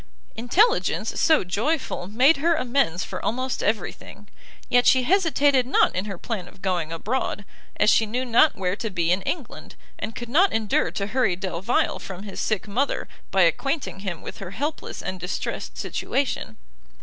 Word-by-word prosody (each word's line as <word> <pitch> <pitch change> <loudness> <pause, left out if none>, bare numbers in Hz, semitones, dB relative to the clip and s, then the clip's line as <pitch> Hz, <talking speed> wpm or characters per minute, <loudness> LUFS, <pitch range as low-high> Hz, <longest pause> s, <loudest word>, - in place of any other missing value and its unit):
Intelligence 395 - +2
so 315 -7 +4
joyful 215 - -1
made 255 +10 +4
her 330 +4 +2
amends 250 - 0
for 185 - -6
almost 255 +3 -1
every 210 -3 0
thing; 205 - -14 0.4
yet 245 0 +3
she 260 -1 +5
hesitated 290 -6 +3
not 265 - +3
in 185 +2 -1
her 200 -3 -5
plan 195 -2 -4
of 190 - -17
going 175 -4 -1
abroad, 205 +3 -2 0.3
as 210 - +5
she 220 - +3
knew 250 +4 -2
not 245 +6 +4
where 185 -1 -1
to 225 +1 -4
be 175 -3 0
in 185 +2 +2
England, 290 - -5 0.2
and 225 - -5
could 240 - -6
not 345 +11 +4
endure 220 -2 +1
to 200 - -3
hurry 220 -3 +1
Delvile 190 +3 -1
from 190 0 -8
his 200 -2 -7
sick 215 -1 -1
mother, 250 +8 -1 0.2
by 190 -1 +4
acquainting 270 - 0
him 190 -5 -5
with - - -8
her 195 - -6
helpless 290 - -4
and 185 - -4
distressed 180 +2 -4
situation. 265 - -2
220 Hz, 175 wpm, -24 LUFS, 190-265 Hz, 0.4 s, she